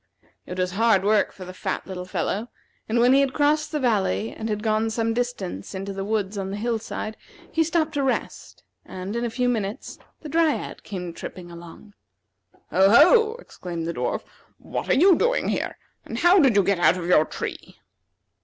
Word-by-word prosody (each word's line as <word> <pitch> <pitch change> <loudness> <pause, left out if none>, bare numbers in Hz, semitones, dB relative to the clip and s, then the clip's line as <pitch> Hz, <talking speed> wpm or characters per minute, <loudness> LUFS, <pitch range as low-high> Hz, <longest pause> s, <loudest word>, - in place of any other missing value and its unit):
It 180 - -6
was 180 0 0
hard 215 -1 +3
work 210 0 +3
for 185 - -10
the 185 - -9
fat - - -4
little 180 -1 -6
fellow, 195 +5 -2 0.4
and 225 - +1
when 245 +2 +5
he 275 - +6
had 275 -1 +1
crossed 300 +1 +2
the 305 - -1
valley 190 - 0
and 220 0 -5
had 210 0 -2
gone 220 0 +1
some 225 0 -1
distance 225 - -4
into 195 +1 -4
the 195 0 -4
woods 205 -1 -2
on 190 0 -3
the 200 - -4
hill 230 +1 -1
side, 220 0 -5 0.4
he 325 - +2
stopped 320 -1 0
to 285 - 0
rest, 270 -2 -3 0.2
and, 185 +3 -6
in 235 - -1
a 240 - -1
few 250 +2 -1
minutes, 215 -4 -3 0.2
the 310 - -8
Dryad 320 0 0
came 180 -4 -6
tripping 175 0 -9
along. 170 +4 -12 0.8
"Ho, 190 +1 +5
ho!" 435 - +6
exclaimed 175 - -7
the 170 - -2
dwarf; - - -2 0.3
"what - - -5
are - - +4
you 365 +4 +6
doing 485 +6 +1
here? - - -2 0.3
and - - -6
how 355 +3 +5
did 270 - +4
you 200 - +5
get 195 -1 +1
out 175 - +4
of 175 - -5
your 170 -3 +5
tree?" - - -7
215 Hz, 200 wpm, -24 LUFS, 185-265 Hz, 0.8 s, he